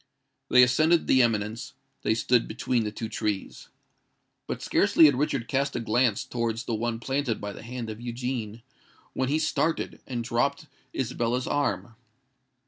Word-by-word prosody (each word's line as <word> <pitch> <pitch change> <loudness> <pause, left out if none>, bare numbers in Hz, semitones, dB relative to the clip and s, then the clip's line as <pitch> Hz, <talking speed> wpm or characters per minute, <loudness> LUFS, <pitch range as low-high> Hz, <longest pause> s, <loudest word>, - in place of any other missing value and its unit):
They 125 - +7
ascended 155 +7 +3
the 130 - +5
eminence: 110 -1 -1 0.3
they 110 - +1
stood 120 +1 +2
between 115 +1 -1
the 105 - -2
two 110 +1 -5
trees. 105 -2 -3 0.8
But - - -4
scarcely 160 - +5
had 145 - +6
Richard 135 -3 -1
cast 140 +1 0
a - - 0
glance 115 -1 +1
towards 115 -1 -2
the 120 - -3
one 115 +1 -2
planted 130 -1 -1
by 105 0 -5
the - - -10
hand 120 0 -6
of 110 +1 -7
Eugene, 120 -2 -4 0.5
when 130 0 -1
he 150 - +2
started, 160 +1 -1
and 120 -3 -3
dropped 140 +6 0 0.3
Isabella's 120 0 -1
arm. 145 -4 -1
120 Hz, 155 wpm, -27 LUFS, 115-130 Hz, 0.8 s, They